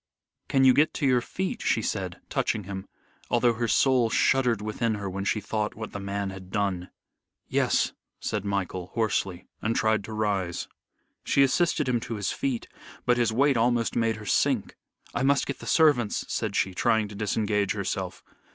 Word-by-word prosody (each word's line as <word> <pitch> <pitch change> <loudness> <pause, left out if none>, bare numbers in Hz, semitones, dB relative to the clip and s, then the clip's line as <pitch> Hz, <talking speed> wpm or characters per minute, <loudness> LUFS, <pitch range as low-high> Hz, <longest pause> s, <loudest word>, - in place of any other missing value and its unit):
"Can 135 -1 +3
you 130 -1 +7
get 150 +4 +3
to 145 - -1
your 125 -2 +4
feet?" 190 +9 -4
she - - +1
said, - - -3
touching 110 - -1
him, 95 0 -6 0.4
although 120 0 +3
her 115 +1 -1
soul 120 +2 +3
shuddered 125 -2 +3
within 110 +1 -1
her 100 -1 -4
when 95 +1 -4
she 105 - +1
thought 105 +1 -2
what 110 -1 -6
the 100 - -5
man 100 0 -3
had 95 -1 -10
done. 95 -3 -1 0.6
"Yes," - - +1 0.3
said 105 -2 -2
Michael, 95 -3 -2
hoarsely, 100 -5 -1 0.2
and 115 +2 0
tried 110 -2 +2
to 110 - -7
rise. 100 -5 -1 0.6
She 140 - +4
assisted 150 +1 +2
him 125 -2 +2
to 115 - -5
his 100 -3 -1
feet 130 -4 -2 0.4
but 125 0 +3
his 120 -2 +2
weight 135 +3 +3
almost 120 0 +1
made 115 -1 +2
her 105 0 -9
sink. - - +1 0.4
"I - - -1
must 140 0 +3
get 140 - -4
the - - -9
servants," 145 -9 +3
said - - -2
she, 95 - +1
trying 110 +3 +2
to - - -9
disengage 105 -1 0
herself. 95 -2 -3
110 Hz, 180 wpm, -27 LUFS, 100-120 Hz, 0.6 s, you